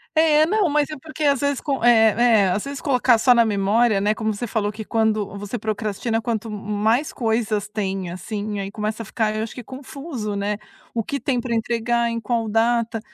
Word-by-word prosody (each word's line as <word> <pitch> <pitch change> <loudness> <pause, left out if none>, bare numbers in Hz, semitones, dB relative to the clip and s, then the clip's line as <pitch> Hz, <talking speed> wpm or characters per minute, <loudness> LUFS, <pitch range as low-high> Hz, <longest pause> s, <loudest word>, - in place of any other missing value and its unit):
É. 310 -1 +5
Não, 395 +1 +2
mas 295 0 +1
é 305 - -5
porque 310 +1 -6
às 280 -2 +3
vezes 285 -1 0
co 275 -5 -2
eh 225 -3 +6
eh, 230 -5 +4
às 200 +3 -1
vezes 280 -1 -6
colocar 250 -4 +3
só 250 +3 +5
na 235 - +6
memória, 210 +1 +2
né 210 +1 +2
Como 220 -1 -1
você 240 +4 -4
falou 210 -1 -1
que 220 +1 -7
quando 215 -3 0
você 205 +4 -5
procrastina, 220 +1 -2
quanto 225 -1 -3
m 210 0 -6 0.2
mais 250 +7 +2
coisas 220 -3 -1
tem, 195 -4 -3
assim, 205 +2 -4
aí 195 0 -4
começa 215 +1 -3
a - - -11
ficar, 215 +1 -1
eu 215 - -1
acho 225 - -6
que, 250 - -8
confuso, 260 -4 -6
né; 205 +1 -1 0.4
o 230 -2 -1
que 280 - -3
tem 270 -5 0
para 235 -1 -3
entregar, 235 +1 0
em 230 - -2
qual 230 0 -1
data. 230 +1 +1
225 Hz, 215 wpm, -22 LUFS, 210-245 Hz, 0.4 s, eh